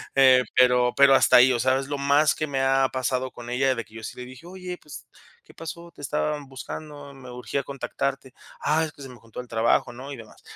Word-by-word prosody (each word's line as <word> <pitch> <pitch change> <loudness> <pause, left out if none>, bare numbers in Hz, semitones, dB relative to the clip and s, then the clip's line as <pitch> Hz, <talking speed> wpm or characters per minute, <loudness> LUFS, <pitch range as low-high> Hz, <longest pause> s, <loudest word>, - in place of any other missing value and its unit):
Eh, 130 -2 +6
pero 125 -1 +4
pero 140 -1 +6
hasta 130 -1 +6
ahí, 125 +1 +7
o 120 - 0
sea, 130 +2 +2
es 135 - -6
lo 145 -1 -3
más 140 +2 +3
que 155 - -3
me 135 -1 -1
ha 135 0 +3
pasado 130 0 -1
con 120 0 -10
ella, 130 +1 +1
de 115 - -4
que 110 -1 -20
yo 110 - -9
sí - - -7
le 125 - -7
dije: 130 +5 -13
"Oye, 180 -1 -7
pues, 140 -2 -11 0.4
¿qué - - -19
pasó? 170 +1 -9
Te - - -14
estaban 145 +1 -2
buscando, 145 +1 -9
me 130 -2 -12
urgía 125 +3 -4
contactarte". 135 -1 -4 0.3
"Ah, 155 +2 +2
es 155 - -9
que - - -16
se 135 - -8
me 125 - -12
juntó 115 +2 -9
el 125 - -14
trabajo, 115 +1 +1
¿no?, 135 +4 -9
y 135 - -8
demás". 110 -2 -14
135 Hz, 245 wpm, -25 LUFS, 125-145 Hz, 0.4 s, ahí